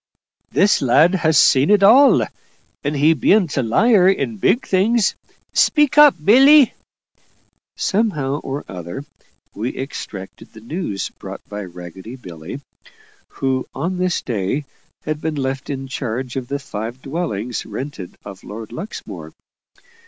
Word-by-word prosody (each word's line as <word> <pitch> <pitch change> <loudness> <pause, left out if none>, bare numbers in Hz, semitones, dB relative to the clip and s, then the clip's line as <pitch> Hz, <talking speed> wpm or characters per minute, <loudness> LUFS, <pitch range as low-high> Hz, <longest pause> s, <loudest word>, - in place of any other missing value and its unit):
"This 200 +1 +3
lad 145 +7 +4
ha' 170 -4 +1
seen 140 -1 +4
it 205 -1 +4
all. 260 +8 +6 0.6
And 145 +1 -2
he 150 +3 +4
bean't 180 0 +2
a 135 - +1
liar 190 - +4
in 135 - -1
big 205 - +1
things 205 +3 +2 0.4
speak 295 -2 +3
up, 295 -1 +8
Billy." 270 +4 +7 1.0
Somehow 155 -10 0
or 135 +2 -5
other, 90 - -7 0.5
we 115 +5 -4
extracted 105 -7 -8
the 110 - -12
news 115 - -4
brought - - -9
by 105 0 -6
ragged 90 +7 -10
Billy, 90 - -9 0.7
who 130 -1 -2
on 180 +1 -3
this 180 -1 0
day 120 +5 -2 0.4
had 155 0 -3
been 160 -1 -2
left 135 0 -3
in 135 -1 -4
charge 125 -1 -4
of 130 -2 -4
the 140 - -2
five 120 -2 -7
dwellings 135 - -3
rented 110 -3 -7
of 100 -2 -10
Lord 110 +1 -9
Luxmore. 200 +7 -8
140 Hz, 135 wpm, -19 LUFS, 115-185 Hz, 1.0 s, up